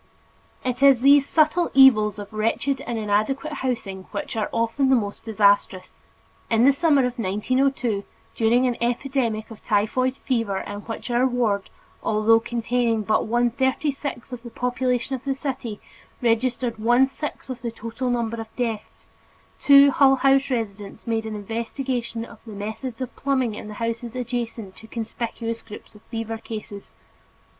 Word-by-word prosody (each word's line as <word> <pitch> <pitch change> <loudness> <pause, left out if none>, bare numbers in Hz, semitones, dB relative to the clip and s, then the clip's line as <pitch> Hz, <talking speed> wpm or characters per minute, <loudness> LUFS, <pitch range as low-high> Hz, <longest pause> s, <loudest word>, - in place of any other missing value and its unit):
It 250 +1 -2
is 275 -3 +6
these 280 +1 +6
subtle 320 +2 +3
evils 215 -6 +6
of 205 +1 -8
wretched 230 +5 0
and 240 -1 -2
inadequate 220 +8 0
housing 200 -7 -3
which 205 - -5
are 215 -2 -1
often 230 +4 +1
the 265 - +6
most 205 -4 -2
disastrous. 200 -4 +1 0.5
In 230 +1 +4
the 275 - +7
summer 285 -3 +3
of 250 0 -4
1902 230 +2 0 0.3
during 240 +3 +3
an 245 -2 0
epidemic 235 -2 -1
of 220 - -12
typhoid 240 +5 +1
fever 230 -8 -1
in 205 +1 -5
which 225 +3 -6
our 245 +2 +3
ward, 230 -6 0 0.3
although 220 +1 +3
containing 235 -1 0
but 215 +1 +1
one 240 +1 +2
thirty 265 +4 0
sixth 275 -2 -6
of 245 - -6
the 240 - -9
population 250 +2 -1
of 255 - -8
the 275 -1 -1
city, 255 -6 -4 0.4
registered 240 0 0
one 240 +4 +4
sixth 270 0 -6
of 250 -2 -7
the 235 - -3
total 230 +3 -4
number 230 -2 -1
of 225 - -8
deaths, 230 -4 -4 0.5
two 285 - +3
of 280 0 +10
the 280 - +4
Hull 270 -1 +7
House 270 +1 +3
residents 210 -5 -4
made 225 -1 -1
an 215 - -4
investigation 230 +2 -3
of 225 - -14
the 220 - -8
methods 220 +5 -6
of 255 - -5
plumbing 260 -5 0
in 210 - -8
the 210 - -8
houses 230 +1 -4
adjacent 235 -5 -4
to 220 - -12
conspicuous 230 0 -4
groups 215 0 -12
of 210 - -16
fever 225 -1 -4
cases. 215 -3 -8
235 Hz, 165 wpm, -23 LUFS, 220-260 Hz, 0.5 s, of